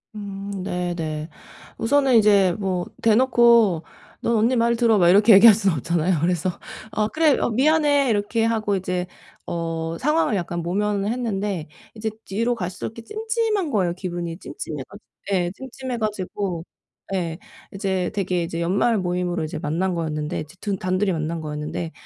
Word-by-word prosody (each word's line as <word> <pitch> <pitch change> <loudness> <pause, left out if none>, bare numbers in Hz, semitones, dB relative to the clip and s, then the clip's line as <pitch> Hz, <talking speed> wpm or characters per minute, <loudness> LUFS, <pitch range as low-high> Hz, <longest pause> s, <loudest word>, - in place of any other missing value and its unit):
음 200 -1 -6
네네. 170 -4 -3 0.5
우선은 270 +1 +3
이제 200 -4 +5
뭐 185 -3 -1 0.2
대놓고 230 -6 +4 0.4
"넌 235 - +1
언니 230 +4 +3
말 235 0 +2
들어." 230 -2 +3
막 175 -1 +5
이렇게 210 +4 +7
얘기할 205 +2 +9
수는 195 -4 +1
없잖아요. 170 +4 0
그래서 175 +1 +1 0.4
"아 215 -1 0
그래. 310 +3 +3
아 - - +1
미안해." 285 +2 +3
이렇게 220 +2 +1
하고 220 -3 0
이제 180 -1 -2 0.4
어 165 -1 -3
상황을 300 -5 +2
약간 175 -1 -3
모면을 200 +3 -1
했는데 205 -8 -2 0.3
이제 220 0 -3
뒤로 230 +5 0
갈수록 180 -5 -4
이렇게 230 - -8
찜찜한 435 - -1
거예요 185 -5 +1
기분이 175 -2 -5
찜찜해 150 -6 -6
가지 200 +2 -13 0.3
예, 175 -2 +1
찜찜해 260 +1 -6
가지고 200 -4 -3 0.5
예. 170 -3 -2 0.4
이제 190 -2 -1
되게 185 -3 0
이제 165 0 -4
연말 200 +6 +2
모임으로 180 -2 -1
이제 155 0 -4
만난 170 +5 -1
거였는데 155 -2 -3
이제 155 +4 -11
둔 200 -2 -2
단둘이 185 +2 0
만난 160 0 -2
거였는데 150 +2 -4
195 Hz, 335 characters per minute, -23 LUFS, 175-225 Hz, 0.5 s, 얘기할